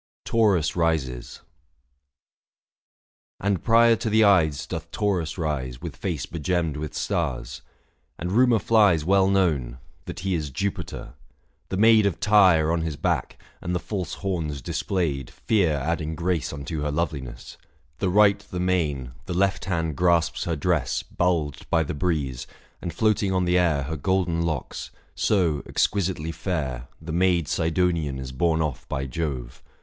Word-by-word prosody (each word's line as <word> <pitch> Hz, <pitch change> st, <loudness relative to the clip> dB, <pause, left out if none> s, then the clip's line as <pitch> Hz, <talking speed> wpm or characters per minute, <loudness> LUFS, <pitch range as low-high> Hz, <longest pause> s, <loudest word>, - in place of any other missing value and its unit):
680 -, -, -8 dB
TAURUS 100 Hz, -9 st, +3 dB
RISES. 80 Hz, -8 st, -1 dB, 2.0 s
And 100 Hz, -2 st, 0 dB
prior 115 Hz, 0 st, +5 dB
to 110 Hz, 0 st, -2 dB
the 110 Hz, 0 st, +5 dB
Ides 80 Hz, -8 st, +3 dB
doth 80 Hz, 0 st, -6 dB
Taurus 90 Hz, -4 st, -1 dB
rise 65 Hz, -7 st, -3 dB
With -, -, -7 dB
face 80 Hz, -9 st, -3 dB
begemmed 85 Hz, -1 st, -1 dB
with 75 Hz, 0 st, -5 dB
stars; 70 Hz, -9 st, -2 dB, 0.6 s
and 90 Hz, +3 st, -4 dB
rumour 120 Hz, +2 st, +4 dB
flies 105 Hz, -9 st, +3 dB
Well 95 Hz, +1 st, +4 dB
known 80 Hz, -11 st, +1 dB
— -, -, -35 dB
that -, -, -6 dB
he 95 Hz, 0 st, -1 dB
is 80 Hz, -4 st, -2 dB
Jupiter: 100 Hz, +9 st, -4 dB, 0.6 s
The 95 Hz, -, -2 dB
maid 110 Hz, 0 st, +6 dB
685 100 Hz, -, +2 dB
Of -, -, -31 dB
Tyre 95 Hz, -7 st, +5 dB
on 85 Hz, 0 st, 0 dB
his 80 Hz, -2 st, -3 dB
back, -, -, -1 dB, 0.2 s
and 90 Hz, -, -2 dB
the -, -, 0 dB
false 90 Hz, -3 st, -4 dB
horns 80 Hz, -9 st, -3 dB
displayed, 75 Hz, -9 st, -2 dB
Fear 100 Hz, -8 st, +1 dB
adding 80 Hz, +2 st, -2 dB
grace 85 Hz, -1 st, -1 dB
unto 70 Hz, +2 st, -5 dB
her 75 Hz, -, -1 dB
loveliness; 70 Hz, -6 st, -4 dB, 0.4 s
The 95 Hz, -, +1 dB
right 100 Hz, +1 st, +5 dB
the 100 Hz, -3 st, -7 dB
mane, 75 Hz, -9 st, 0 dB, 0.2 s
the 90 Hz, -, -3 dB
left 95 Hz, +1 st, +1 dB
hand 85 Hz, -5 st, -1 dB
grasps 85 Hz, -1 st, +2 dB
her 85 Hz, -, -1 dB
dress, 75 Hz, -4 st, 0 dB
Bulged 85 Hz, -6 st, -1 dB
by 80 Hz, -1 st, +3 dB
the 75 Hz, -, -4 dB
breeze, 70 Hz, -6 st, -2 dB, 0.3 s
and 85 Hz, -, -4 dB
floating 105 Hz, -1 st, +1 dB
on 95 Hz, -1 st, +1 dB
the 90 Hz, +1 st, +3 dB
air 80 Hz, -6 st, +2 dB
Her 80 Hz, +3 st, -4 dB
golden 90 Hz, +1 st, 0 dB
locks; 85 Hz, -2 st, -3 dB, 0.2 s
so, 85 Hz, -8 st, +1 dB
exquisitely 90 Hz, -5 st, 0 dB
fair, 65 Hz, -10 st, -3 dB
690 -, -, -15 dB
The 80 Hz, -, -4 dB
maid 85 Hz, -2 st, +2 dB
Sidonian 80 Hz, -2 st, 0 dB
is 65 Hz, -1 st, -6 dB
borne 80 Hz, +4 st, +1 dB
off 75 Hz, -5 st, -5 dB
by 65 Hz, 0 st, -2 dB
Jove. 70 Hz, -2 st, -4 dB
85 Hz, 160 wpm, -25 LUFS, 75-95 Hz, 2.0 s, maid